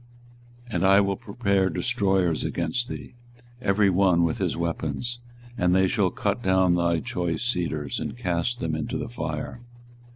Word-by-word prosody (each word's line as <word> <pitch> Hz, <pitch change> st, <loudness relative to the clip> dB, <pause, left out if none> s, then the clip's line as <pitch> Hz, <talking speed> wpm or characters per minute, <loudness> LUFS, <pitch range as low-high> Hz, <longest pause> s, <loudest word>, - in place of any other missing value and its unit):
24:022:007 110 Hz, -, -5 dB
And 85 Hz, -, +1 dB
I 100 Hz, +1 st, +7 dB
will 100 Hz, -1 st, +1 dB
prepare 100 Hz, -2 st, 0 dB
destroyers 95 Hz, -9 st, +1 dB
against 85 Hz, +9 st, -1 dB
thee, -, -, -7 dB, 0.5 s
every 100 Hz, -3 st, +3 dB
one 90 Hz, -2 st, +4 dB
with 85 Hz, -2 st, 0 dB
his -, -, -1 dB
weapons: 85 Hz, -, -2 dB, 0.4 s
and 90 Hz, 0 st, +3 dB
they 95 Hz, 0 st, +4 dB
shall 95 Hz, -1 st, +2 dB
cut 100 Hz, +5 st, -2 dB
down 95 Hz, -3 st, +3 dB
thy 85 Hz, -1 st, +2 dB
choice 85 Hz, +4 st, -2 dB
cedars, 85 Hz, -, -1 dB
and -, -, -5 dB
cast 100 Hz, +3 st, -1 dB
them 80 Hz, -1 st, -1 dB
into 80 Hz, -1 st, -2 dB
the -, -, -4 dB
fire. 90 Hz, -, -5 dB
95 Hz, 160 wpm, -25 LUFS, 85-100 Hz, 0.5 s, I